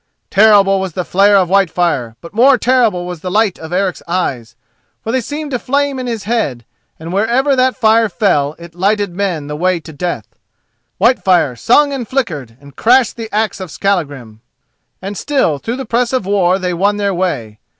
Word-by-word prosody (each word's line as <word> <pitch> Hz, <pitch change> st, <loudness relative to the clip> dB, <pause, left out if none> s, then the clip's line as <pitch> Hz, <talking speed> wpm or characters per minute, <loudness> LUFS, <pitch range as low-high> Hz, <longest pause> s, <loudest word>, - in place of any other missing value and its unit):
Terrible 200 Hz, -2 st, +5 dB
was 190 Hz, -3 st, -4 dB
the 180 Hz, 0 st, -3 dB
flare 200 Hz, +2 st, +4 dB
of 185 Hz, -2 st, +2 dB
Whitefire; 170 Hz, -, +1 dB
but 170 Hz, -, -12 dB
more 255 Hz, +4 st, +5 dB
terrible 230 Hz, -8 st, +1 dB
was 180 Hz, -2 st, -6 dB
the 180 Hz, -, -5 dB
light 210 Hz, 0 st, +1 dB
of 160 Hz, +1 st, -9 dB
Eric's 185 Hz, 0 st, -1 dB
eyes, 130 Hz, -11 st, -3 dB, 0.5 s
for 225 Hz, -, -3 dB
they 260 Hz, +1 st, 0 dB
seemed 295 Hz, +4 st, -6 dB
to 250 Hz, -, -1 dB
flame 280 Hz, +1 st, -1 dB
in 255 Hz, -, -4 dB
his 225 Hz, -4 st, -4 dB
head, 200 Hz, -, -2 dB, 0.3 s
and 165 Hz, +2 st, -7 dB
wherever 240 Hz, +8 st, +2 dB
that 255 Hz, 0 st, +1 dB
fire 225 Hz, -2 st, +3 dB
fell 155 Hz, -8 st, 0 dB
it 170 Hz, -1 st, -12 dB
lighted 200 Hz, +1 st, 0 dB
men 180 Hz, -7 st, -2 dB
the 150 Hz, +1 st, -5 dB
way 180 Hz, +2 st, 0 dB
to 160 Hz, -1 st, -12 dB
death. 150 Hz, -, -4 dB, 0.7 s
Whitefire 185 Hz, -, +2 dB
sung 285 Hz, -, +3 dB
and 250 Hz, -4 st, -4 dB
flickered, 155 Hz, -, -3 dB
and 140 Hz, -1 st, -16 dB
crashed 245 Hz, -, +3 dB
the 225 Hz, -2 st, -7 dB
axe 215 Hz, -1 st, -1 dB
of 185 Hz, -2 st, -7 dB
Skallagrim, 145 Hz, -, -3 dB, 0.6 s
and 200 Hz, +2 st, -5 dB
still 230 Hz, -, 0 dB
through 230 Hz, -, -4 dB
the 265 Hz, -, -5 dB
press 235 Hz, +2 st, 0 dB
of 255 Hz, -7 st, 0 dB
war 190 Hz, -2 st, +2 dB
they 180 Hz, -2 st, -2 dB
won 200 Hz, +4 st, +1 dB
their 200 Hz, -1 st, 0 dB
way. 130 Hz, -, -3 dB
195 Hz, 190 wpm, -15 LUFS, 170-230 Hz, 0.7 s, Terrible